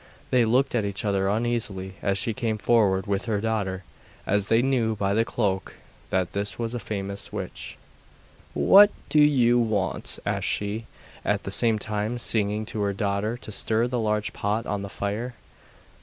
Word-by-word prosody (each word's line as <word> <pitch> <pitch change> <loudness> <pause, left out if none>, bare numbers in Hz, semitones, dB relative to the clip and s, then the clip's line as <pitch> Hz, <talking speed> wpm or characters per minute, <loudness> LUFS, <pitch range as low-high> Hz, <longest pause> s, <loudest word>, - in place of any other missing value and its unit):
They 125 -2 +4
looked 130 +4 +2
at 120 -3 +1
each 100 +1 -2
other 95 -1 +1
uneasily 110 -4 -1
as 100 -1 +1
she 120 -1 +2
came 115 -2 -1
forward 105 -4 +2
with 100 0 -1
her 110 -3 0
daughter, 100 -4 -2 0.4
as 100 0 +1
they 115 +2 +3
knew 120 -5 +1
by 100 -1 0
the 110 +2 +3
cloak 100 -6 -2 0.3
that 95 -2 0
this 100 0 -3
was 115 0 -3
a 120 - -2
famous 100 -2 -5
witch. - - -6 0.8
'What 205 +1 +7 0.2
do 155 - +3
you 125 -5 +5
want?' 105 -6 0
asked - - -1
she, 105 +3 -2 0.4
at - - 0
the - - -5
same 115 -2 +3
time 105 +2 -2
signing 110 -2 0
to 105 -1 -4
her 100 -1 0
daughter 100 +3 -1
to 110 - -9
stir 110 +3 +1
the 125 0 -2
large 105 -1 -1
pot 105 +3 -1
on 105 -1 -2
the 100 - -6
fire. 105 +6 -3
110 Hz, 175 wpm, -25 LUFS, 100-115 Hz, 0.8 s, What